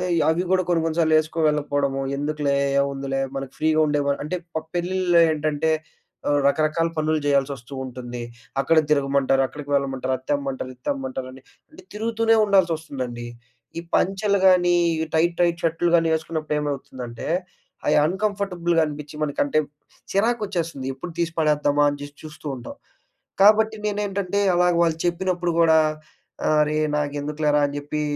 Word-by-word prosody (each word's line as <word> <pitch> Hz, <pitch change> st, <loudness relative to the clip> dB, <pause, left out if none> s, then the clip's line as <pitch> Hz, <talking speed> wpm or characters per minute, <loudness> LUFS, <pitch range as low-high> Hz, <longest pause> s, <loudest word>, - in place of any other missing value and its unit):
ఇ 165 Hz, -, +2 dB
అవి 175 Hz, +3 st, 0 dB
గూడా 185 Hz, 0 st, +3 dB
కొన్ని 170 Hz, -2 st, +2 dB
కొన్ని 165 Hz, +1 st, -2 dB
సార్లు 160 Hz, -1 st, +3 dB
ఏసుకు 155 Hz, +1 st, -7 dB
వెళ్ళకపోవడము. 145 Hz, -2 st, -1 dB, 0.2 s
ఎందుకులే, 145 Hz, -1 st, 0 dB, 0.2 s
ఏముందిలే 135 Hz, -1 st, -2 dB, 0.2 s
మనకు 135 Hz, 0 st, -6 dB
ఫ్రీగా 155 Hz, 0 st, +2 dB
ఉండే 145 Hz, 0 st, +1 dB
వ -, -, +2 dB
అంటే, 155 Hz, +5 st, -3 dB, 0.2 s
ప -, -, +1 dB, 0.2 s
పెళ్ళిల్లో 175 Hz, 0 st, +2 dB
ఏంటంటే, 155 Hz, +1 st, 0 dB, 0.6 s
ఆహ్, 145 Hz, 0 st, +3 dB
రకరకాల 155 Hz, +3 st, +1 dB
పనులు 155 Hz, 0 st, +1 dB
జేయాల్సొస్తూ 140 Hz, -2 st, 0 dB
ఉంటుంది. 120 Hz, -1 st, -7 dB, 0.4 s
అక్కడ 160 Hz, +4 st, +2 dB
తిరగమంటారు. 135 Hz, -2 st, +2 dB
అక్కడికి 150 Hz, 0 st, -10 dB
వెళ్ళమంటారు. 135 Hz, -2 st, -1 dB
అది -, -, -21 dB
తెమ్మంటారు, 135 Hz, -2 st, -2 dB
ఇది 125 Hz, -, -41 dB
తెమ్మంటారండి. 130 Hz, -1 st, -4 dB, 0.3 s
అంటే -, -, -15 dB
తిరుగుతూనే 225 Hz, +1 st, +1 dB
ఉండాల్సొస్తుందండి. 155 Hz, -11 st, 0 dB, 0.5 s
ఈ -, -, -5 dB
పంచలు 200 Hz, +2 st, +1 dB
గానీ 180 Hz, -1 st, +5 dB, 0.3 s
ఈ 160 Hz, -, 0 dB
టైట్, 170 Hz, +2 st, +2 dB
టైట్ 170 Hz, 0 st, +1 dB
షర్టులు 165 Hz, +1 st, +1 dB
కాని 165 Hz, -1 st, +3 dB
ఏసుకున్నప్పుడు 155 Hz, -1 st, -3 dB
ఏమవుతుందంటే 130 Hz, -5 st, -5 dB, 0.6 s
అయి 150 Hz, -, +4 dB
అన్‌కంఫర్టబుల్‍గా 185 Hz, -3 st, 0 dB
అనిపించి 150 Hz, 0 st, -7 dB
మనకంటే 145 Hz, +1 st, +1 dB, 0.5 s
చిరాకొచ్చేస్తుంది 195 Hz, -, -1 dB
ఎప్పుడు 170 Hz, +6 st, -8 dB
తీసి 170 Hz, -1 st, 0 dB
పడేద్దామా 145 Hz, -1 st, +2 dB
అని 145 Hz, -, -4 dB
జేసి 145 Hz, 0 st, -9 dB
చూస్తూ 155 Hz, 0 st, -11 dB
ఉంటాం. 120 Hz, -1 st, -9 dB, 0.7 s
కాబట్టి 215 Hz, +2 st, +5 dB
నేనేంటంటే 200 Hz, -2 st, -1 dB, 0.2 s
అలాగా 180 Hz, -1 st, +3 dB
వాళ్ళు 165 Hz, -1 st, +1 dB
చెప్పినప్పుడు 175 Hz, 0 st, 0 dB
కూడా 160 Hz, -1 st, +5 dB, 0.8 s
అరే 150 Hz, 0 st, +1 dB, 0.2 s
నాకెందుకులేరా 150 Hz, +1 st, 0 dB
అని 145 Hz, -, -7 dB
జెప్పి 145 Hz, +1 st, -3 dB
155 Hz, 140 wpm, -23 LUFS, 140-175 Hz, 0.8 s, గానీ